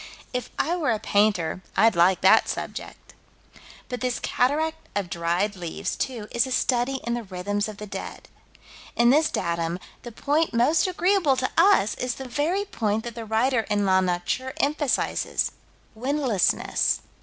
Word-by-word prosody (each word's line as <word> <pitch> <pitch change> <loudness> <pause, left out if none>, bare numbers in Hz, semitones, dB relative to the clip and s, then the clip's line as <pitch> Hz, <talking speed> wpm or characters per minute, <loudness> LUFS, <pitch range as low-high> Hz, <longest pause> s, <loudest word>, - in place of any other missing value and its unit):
If 250 -2 -3
I 340 - +1
were 320 -7 -1
a 225 - +2
painter, 200 -5 +1 0.2
I'd 225 +1 +5
like 175 +2 +4
that - - +5
subject. - - -6 0.7
But 250 -1 -5
this 250 -1 -1
cataract 315 +5 0
of 195 -4 -2
dried 175 +5 0
leaves, 175 -3 -4
too, 240 -6 -4
is 235 +2 +1
a - - -7
study 255 +1 +1
in 235 - -1
the 240 - -2
rhythms 205 +1 -3
of 215 -2 -8
the 210 - -7
dead. 200 - -7 0.7
In 235 +1 +5
this 310 +3 +4
datum, 170 0 -2 0.2
the 240 - -9
point 295 +4 0
most 305 - +3
agreeable 365 -5 +2
to 255 0 -1
us 335 - +4
is 250 -1 -3
the 265 - -7
very 320 +11 0
point 220 - -1
that 235 - -6
the 230 0 -7
writer 225 +3 +2
in 205 -1 +1
La 190 -1 +4
Nature 185 +9 -2
emphasizes. 290 -1 0 0.4
Windlessness. 255 - +1
235 Hz, 160 wpm, -25 LUFS, 205-280 Hz, 0.7 s, I'd